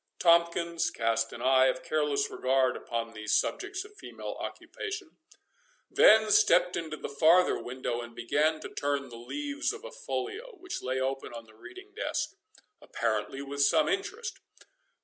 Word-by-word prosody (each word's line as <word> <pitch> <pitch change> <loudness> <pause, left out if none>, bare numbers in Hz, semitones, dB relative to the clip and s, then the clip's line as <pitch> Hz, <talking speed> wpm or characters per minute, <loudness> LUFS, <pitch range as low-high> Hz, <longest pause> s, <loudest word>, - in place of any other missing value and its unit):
Tomkins 170 0 +3
cast 115 0 0
an - - -7
eye 130 0 +5
of 130 - -1
careless 150 -2 0
regard 130 -1 +2
upon 115 -1 -4
these 110 -1 -1
subjects 400 -1 -3
of 420 0 -16
female - - -7
occupation, 400 -5 -6 0.7
then 215 0 +6
stepped 180 -1 +5
into 160 -2 -4
the - - -5
farther 165 +5 +4
window, 125 -1 -3
and 120 0 -10
began 150 +7 +1
to - - -7
turn 140 -1 -2
the 120 - -10
leaves 285 - -3
of 445 +3 -9
a - - -8
folio, 470 -1 -5
which 370 -2 -6
lay 130 +1 -2
open 135 -1 -3
on 115 -1 -8
the 110 - -19
reading 380 - -13
desk, 435 - -2 0.5
apparently 115 +4 -2
with 140 0 -4
some 295 - +4
interest. 425 +5 -3
155 Hz, 155 wpm, -29 LUFS, -, 0.7 s, then